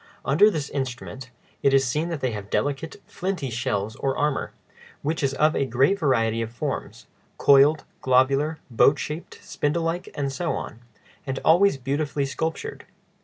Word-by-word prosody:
Under 160 +10 +5
this 155 -8 -3
instrument 130 -1 -5 0.3
it 135 0 +4
is 135 0 +4
seen 150 +7 -1
that 165 -4 -4
they 130 - 0
have 105 -2 -6
delicate, 145 +3 -2
flinty 180 -8 -3
shells 110 -3 -2
or 135 -1 -1
armor, 150 -2 0 0.5
which 155 +3 -1
is 135 -1 0
of 155 +1 +3
a 140 - 0
great 135 +12 +2
variety 115 -6 +1
of 115 0 -4
forms,—coiled, 140 +4 +1 0.2
globular, 135 +4 +2
boat 135 +5 +5
shaped, 155 +4 -6
spindle 155 +3 -1
like, 165 +2 -2
and 140 -1 -2
so 165 +1 -1
on,—and 120 +4 -8
always 175 0 +5
beautifully 140 +2 -1
sculptured. 160 - -4
140 Hz, 150 wpm, -24 LUFS, 130-155 Hz, 0.5 s, Under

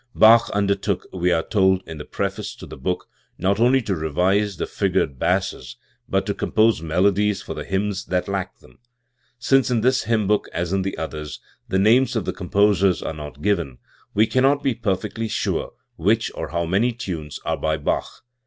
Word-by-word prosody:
Bach 115 +1 +7
undertook, 100 -1 0
we 90 -1 +1
are 80 -1 +2
told 95 -2 +2
in 80 -2 -7
the 75 - -7
preface - - -4
to - - -10
the - - -10
book, - - -3 0.3
not 100 +3 +1
only 125 +2 +4
to 100 - -1
revise 90 +6 0
the - - -2
figured 70 -2 -1
basses, 65 -1 -1 0.3
but 95 0 +1
to 100 - -1
compose 110 -2 +2
melodies 100 +5 +1
for - - -6
the - - -6
hymns 95 0 -2
that 90 -1 -1
lacked 95 -1 -4
them. - - -20 0.6
Since 135 +2 +3
in 120 -3 +1
this 130 +1 +2
hymn 110 -2 +1
book, 105 +2 +1
as 85 +2 -2
in 95 - +1
the 95 +1 -3
others, 75 -2 -5 0.3
the 95 - 0
names 120 +6 +4
of 110 - -1
the - - -2
com 90 -3 -8
posers 100 -2 +3
are - - -3
not 75 -1 -9
given, 85 -11 0 0.4
we 110 +2 +5
cannot 135 +4 +2
be 135 - +2
perfectly 110 0 -2
sure - - -2 0.3
which 110 +6 +1
or - - -5
how 85 0 -2
many 100 +8 +1
tunes 85 - -6
are - - 0
by 80 0 0
Bach. 75 - -3
100 Hz, 190 wpm, -22 LUFS, 85-110 Hz, 0.6 s, Bach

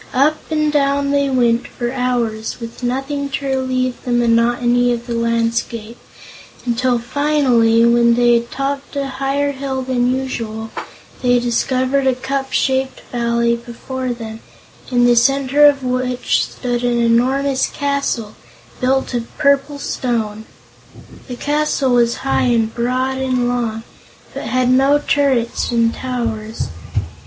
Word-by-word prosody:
Up 300 +4 +2
and 305 -1 +1
down 280 -1 +1
they 280 -1 +2
went 240 -2 +2
for 240 -1 -4
hours, 240 -4 -2
with 230 +1 -8
nothing 270 +3 -2
to 280 +1 -4
relieve 255 -2 -1
the 250 - -3
monotony 240 +1 +2
of 240 0 -3
the 240 - -4
landscape, 230 0 -1 0.7
until 245 +1 +1
finally, 240 -3 +2
when 235 0 +4
they 240 0 +4
had 235 0 +1
topped 275 +2 -4
a 280 -1 -1
higher 275 +1 -1
hill 265 -1 -4
than 250 -1 0
usual, 230 -4 -4 0.5
they 245 -1 +3
discovered 255 +3 0
a 260 - +3
cup 270 +1 -3
shaped 265 0 0
valley 235 -1 +1
before 250 +2 -5
them 225 -2 -7 0.5
in 245 -1 +3
the 240 0 +5
center 275 +4 +4
of 280 -2 +2
which 250 0 0
stood 245 -1 -3
an 245 -1 +1
enormous 260 +4 +2
castle, 280 -6 -2 0.5
built 265 +1 0
of 235 -1 -2
purple 280 0 +2
stone. 220 -6 -3 0.8
The 250 - -5
castle 290 -1 0
was 235 -1 +3
high 270 - +2
and 230 -2 +1
broad 255 +2 -1
and 255 -2 0
long, 235 -2 -2 0.5
but - - -6
had 255 -1 +1
no 270 +3 +4
turrets 275 -5 0
and 230 -1 +2
towers. 230 -4 -4
250 Hz, 135 wpm, -18 LUFS, 235-270 Hz, 0.8 s, the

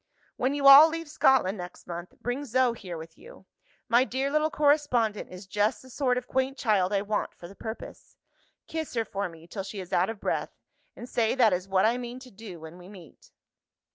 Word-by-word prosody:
"When 260 +3 0
you 285 -1 -2
all 280 +4 +10
leave 330 0 -5
Scotland 260 -9 +2
next 180 0 -9
month, 175 +1 -8
bring 245 +4 -3
Zo 255 -2 +2
here 185 -7 -8
with 160 0 -11
you. - - -15 0.4
My 240 +2 +4
dear 265 +2 -2
little 305 +1 +2
correspondent 285 -8 +1
is 185 +2 -10
just 205 +5 0
the 260 - -14
sort 250 -2 0
of 250 - -3
quaint 265 +1 -1
child 205 -5 +1
I 200 -1 +1
want 210 0 -2
for 175 - -11
the 190 - -13
purpose. 220 +3 -9 0.5
Kiss 320 -4 -5
her 230 -1 0
for 200 -2 -3
me 165 -1 -14
till 195 +3 -6
she 195 +1 -7
is 185 0 -8
out 180 +3 +2
of 225 -2 -6
breath - - -3 0.4
and 240 - -9
say 230 -2 0
that 230 -6 +4
is 180 +1 -2
what 190 0 +2
I 235 +3 +2
mean 245 0 -6
to 255 -1 -13
do 195 -4 -10
when 160 +2 -11
we 180 +1 -13
meet." 185 -5 -15
225 Hz, 215 wpm, -27 LUFS, 190-260 Hz, 0.5 s, all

